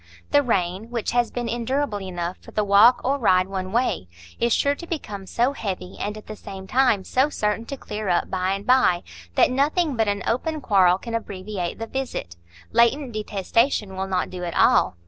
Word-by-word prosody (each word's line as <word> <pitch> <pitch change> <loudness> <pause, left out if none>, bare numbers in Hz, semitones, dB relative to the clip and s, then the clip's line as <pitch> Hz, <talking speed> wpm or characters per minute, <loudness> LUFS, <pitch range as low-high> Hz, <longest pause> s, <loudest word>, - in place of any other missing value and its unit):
The 290 - +5
rain, 195 -3 -1
which 235 -2 -2
has 240 0 +2
been 240 -1 -4
endurable 240 -2 -1
enough 175 -1 -4
for - - -15
the 215 - 0
walk 210 +5 +6
or 275 +2 0
ride 185 -6 +4
one 190 -1 -4
way, 235 - 0 0.3
is 235 - +1
sure 280 +5 +3
to 340 +4 -9
become 205 - -5
so 245 +7 +1
heavy, 190 -7 -5
and 210 +1 -3
at 215 - -11
the 215 - -7
same 195 -2 -9
time 245 -3 +2
so 260 +8 +1
certain 210 -4 -1
to 275 - -5
clear 210 -4 -5
up 175 - +1
by 185 0 0
and 195 +1 -5
by, 250 -9 +4 0.3
that - - +4
nothing 290 +3 +1
but 225 -2 +1
an 200 -2 -1
open 310 +7 -1
quarrel 190 -8 +4
can 230 +4 -8
abbreviate 195 -4 -4
the 225 - -4
visit; 250 - -4 0.4
latent 240 +4 +3
detestation 210 0 0
will 190 +1 -3
not 185 -1 -1
do 180 -1 -6
at 170 -1 -4
all. - - +4
215 Hz, 200 wpm, -23 LUFS, 190-250 Hz, 0.4 s, walk